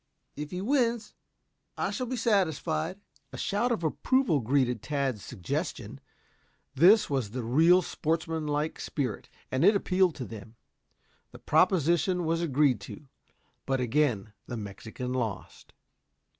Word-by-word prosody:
If 150 Hz, +1 st, -5 dB
he 180 Hz, +3 st, -4 dB
wins 235 Hz, -2 st, 0 dB, 0.6 s
I -, -, -1 dB
shall 255 Hz, -2 st, -3 dB
be 255 Hz, -, -2 dB
satisfied." 180 Hz, -, 0 dB, 0.3 s
A -, -, -8 dB
shout 230 Hz, +5 st, 0 dB
of 220 Hz, -8 st, -1 dB
approval 210 Hz, -, +1 dB
greeted 125 Hz, -1 st, +1 dB
Tad's 135 Hz, -7 st, -2 dB
suggestion. 85 Hz, -, -4 dB, 0.7 s
This 185 Hz, +10 st, +6 dB
was 135 Hz, -7 st, -1 dB
the 125 Hz, +3 st, -5 dB
real 165 Hz, +10 st, +5 dB
sportsman 160 Hz, 0 st, -2 dB
like 150 Hz, +1 st, -1 dB
spirit, 130 Hz, -8 st, -4 dB, 0.2 s
and 130 Hz, +3 st, +1 dB
it 205 Hz, +4 st, +6 dB
appealed 185 Hz, -3 st, +2 dB
to 130 Hz, -, -5 dB
them. 110 Hz, 0 st, -10 dB, 0.8 s
The -, -, -10 dB
proposition 180 Hz, 0 st, +2 dB
was 165 Hz, +1 st, 0 dB
agreed 145 Hz, -4 st, +2 dB
to. 150 Hz, -, -10 dB, 0.6 s
But 135 Hz, -1 st, +1 dB
again 125 Hz, -5 st, 0 dB
the 120 Hz, -, -5 dB
Mexican 110 Hz, +5 st, -6 dB
lost. 115 Hz, -6 st, -4 dB
150 Hz, 130 wpm, -28 LUFS, 125-185 Hz, 0.8 s, This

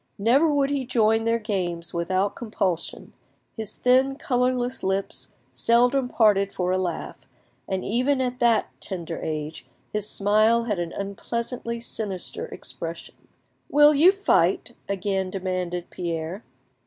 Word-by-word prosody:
Never 265 Hz, +10 st, +4 dB
would 285 Hz, -1 st, +2 dB
he 280 Hz, -2 st, 0 dB
join 225 Hz, -2 st, +2 dB
their 230 Hz, 0 st, +2 dB
games 180 Hz, -6 st, -3 dB
without 185 Hz, +3 st, 0 dB
compulsion; 195 Hz, -7 st, -3 dB, 0.4 s
his 220 Hz, -3 st, -6 dB
thin, 260 Hz, +2 st, +3 dB
colourless 250 Hz, -2 st, 0 dB
lips 190 Hz, -9 st, -2 dB, 0.2 s
seldom 245 Hz, -, +3 dB
parted 200 Hz, -4 st, +3 dB
for 180 Hz, 0 st, -1 dB
a 185 Hz, -, +2 dB
laugh, 175 Hz, -3 st, -4 dB, 0.5 s
and 190 Hz, -1 st, -2 dB
even 255 Hz, +6 st, +1 dB
at 250 Hz, -1 st, -1 dB
that 235 Hz, -2 st, +3 dB
tender 170 Hz, -4 st, -5 dB
age 155 Hz, 0 st, -4 dB, 0.3 s
his 210 Hz, 0 st, -1 dB
smile 215 Hz, +3 st, +3 dB
had 210 Hz, -5 st, -2 dB
an 170 Hz, -1 st, -3 dB
unpleasantly 235 Hz, +4 st, -4 dB
sinister 210 Hz, -5 st, -3 dB
expression. 165 Hz, 0 st, -7 dB, 0.6 s
"Will 295 Hz, +1 st, +6 dB
you 320 Hz, +6 st, +7 dB
fight?" 395 Hz, 0 st, +1 dB, 0.2 s
again 195 Hz, -1 st, -1 dB
demanded 185 Hz, -2 st, -3 dB
Pierre. 170 Hz, +3 st, -4 dB
210 Hz, 130 wpm, -25 LUFS, 185-245 Hz, 0.6 s, you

